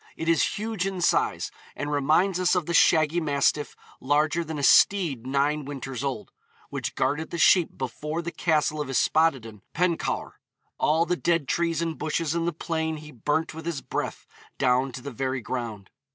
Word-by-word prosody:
It 165 - -4
is 165 -2 +2
huge 215 -3 -2
in 190 -2 -4
size, 175 - +1 0.2
and 145 0 -4
reminds 155 +6 +2
us 185 0 +3
of 180 -3 0
the 170 - -3
'shaggy 160 0 +4
mastiff 145 0 0 0.2
larger 150 +5 +1
than 160 -1 -6
a 145 - -4
steed 150 - +4
nine 145 +3 +1
winters 135 -2 -6
old,' 135 -2 -4 0.4
which - - -4
guarded 145 +5 -1
the - - -5
sheep 170 +1 +4
before 150 +6 -4
the 170 - -4
castle 155 -3 0
of 145 - -4
Yspaddaden 135 -6 +1
Pencawr. 175 -1 -1 0.4
'All 160 +2 +3
the 180 - 0
dead 170 -4 0
trees 170 +1 0
and 165 -2 -4
bushes 155 0 -1
in 170 0 -1
the - - +1
plain 160 -1 -3
he 150 0 -11
burnt 150 +6 -1
with 160 +1 -8
his 160 -5 -3
breath - - -4 0.3
down 130 0 +2
to 130 - -8
the 140 - -6
very 130 +2 -2
ground.' 110 -3 -5
155 Hz, 180 wpm, -26 LUFS, 135-170 Hz, 0.4 s, shaggy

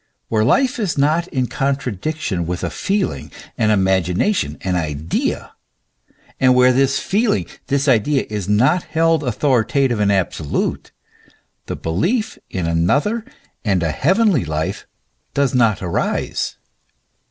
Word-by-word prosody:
Where 110 -1 +2
life 250 - +2
is 195 -9 -1
not 155 +5 +2
in 130 -7 -1
contra 135 0 -1
diction 100 - -3
with 90 +1 -3
a - - -2
feeling, 200 -1 -2 0.2
an 110 - +1
imagination, 95 - +1
an 95 -1 -1
idea, 80 -1 -2 0.9
and 130 -1 +5
where 125 0 +5
this 135 +1 +2
feeling, 210 +1 +1 0.2
this 140 +1 0
idea, 135 +3 +2
is 105 -3 -4
not 130 +12 +3
held 165 -1 +1
authoritative 130 -1 +1
and 100 -1 +3
absolute, 90 -6 -1 0.8
the - - -3
belief 180 - -1
in 90 -3 -3
another 135 - +1 0.4
and 95 -5 +1
a 80 - 0
heavenly 190 - +2
life 80 -1 -3 0.5
does 140 -3 +1
not 115 -6 +2
arise. 85 -2 -2
125 Hz, 130 wpm, -19 LUFS, 95-155 Hz, 0.9 s, and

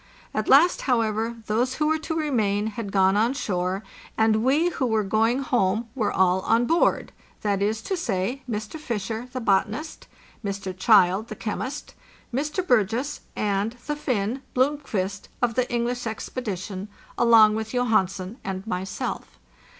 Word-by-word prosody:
At 215 - -1
last, 315 +7 +6
however, 225 -1 +1
those 240 +5 0
who 300 - 0
were 315 +1 +2
to 320 +1 -4
remain 220 -10 +1
had 220 -1 -4
gone 190 0 +4
on 230 +6 +2
shore, 185 -4 -2 0.3
and 220 0 +3
we 295 +7 +3
who 270 -6 -1
were 220 -2 +1
going 225 +6 +1
home 225 -2 +1
were 230 -6 0
all 185 0 +3
on 230 +5 +2
board 330 +6 +2 0.3
—that 200 -2 0
is 215 +2 0
to 385 - -1
say, 240 - -2
Mr. 215 +7 -4
Fisher, 230 -3 -4
the 255 - -4
botanist; 220 +8 -1 0.4
Mr. 195 -2 -4
Child, 190 +1 +4
the - - -7
chemist; 255 +6 -5 0.4
Mr. 300 +7 -1
Burgess; 240 +5 +1 0.2
and 205 +2 0
the 295 - -2
Finn, 250 -3 -1
Blomqvist, 250 -8 -1
of 240 -2 +1
the 255 +2 0
English 240 0 -1
expedition, 205 -4 -5 0.3
along 225 -2 +6
with 220 0 -3
Johansen 215 -3 0
and 190 0 -4
myself. 190 -3 -4
220 Hz, 150 wpm, -25 LUFS, 200-255 Hz, 0.4 s, last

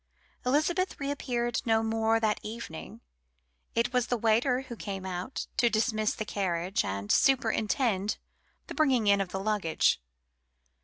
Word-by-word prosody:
Elizabeth 335 +7 +1
reappeared 250 -4 -1
no 225 -1 +2
more 225 0 +2
that 215 -2 +1
evening. 210 - -8 0.7
It 230 +2 +1
was 250 -1 +2
the 245 - 0
waiter 235 +4 +2
who 255 -3 -8
came 195 -3 -5
out 185 +6 -4
to 240 - +4
dismiss 215 -1 +1
the 215 - -4
carriage 185 -2 -1
and 100 +1 -3
superintend 225 -5 +2 0.5
the - - -7
bringing 265 -8 +2
in 200 -1 +4
of 195 - -3
the 190 - -4
luggage. 195 - +1
220 Hz, 140 wpm, -29 LUFS, 200-250 Hz, 0.7 s, to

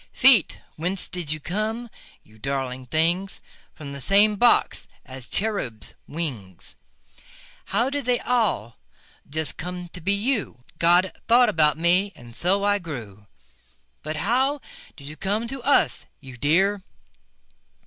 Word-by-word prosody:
Feet, 255 - +5 0.2
whence 180 +4 -2
did 175 -5 -5
you 155 - -2
come, 215 +8 -3 0.4
you 110 +1 -21
darling 130 0 -3
things? 170 +6 0 0.4
From 145 -2 -8
the 140 0 -7
same 205 +8 +4
box 240 +4 +3 0.2
as 130 -1 -9
the - - -6
cherubs' 160 - -3
wings. 120 - -6 0.9
How 235 +7 0
did 285 -2 -2
they 245 -1 +2
all 215 - 0 0.5
just 160 +1 -3
come 180 +1 -6
to 180 - -9
be 195 +5 +1
you? 205 - -2 0.2
God 175 +2 +5 0.2
thought 240 +2 +6
about 150 -2 +3
me, 180 +5 +2
and 120 -1 -14
so 195 +6 +1
I 205 0 +2
grew. 110 - -8 0.7
But 155 +1 -4
how 260 - +1 0.4
did 140 - -12
you 150 - -7
come 210 +7 -2
to 270 0 -6
us, 280 +3 +2
you 130 -2 -11
dear? 190 - +2
175 Hz, 140 wpm, -24 LUFS, 140-210 Hz, 0.9 s, thought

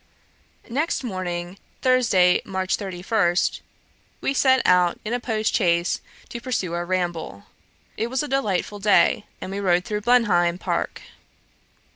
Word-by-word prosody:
Next 285 +5 -1
morning, 185 -3 -4 0.2
Thursday, 230 -9 +4
March 190 -1 -1
31, 185 -2 -1 0.8
we 270 - -1
set 260 -1 +3
out 180 -1 +3
in 220 - -2
a 245 - 0
post 220 -3 -1
chaise 170 -4 +1 0.3
to 235 - -6
pursue 210 -9 -2
our 175 0 -3
ramble. 175 - -3 0.5
It 225 - -1
was 260 +3 -1
a - - -4
delightful 210 -7 -1
day, 205 +1 +3
and 185 - -6
we 200 - -3
rode 180 -2 +2
through 210 -2 -3
Blenheim 200 -8 +3
park. - - -3
195 Hz, 135 wpm, -23 LUFS, 180-235 Hz, 0.8 s, Thursday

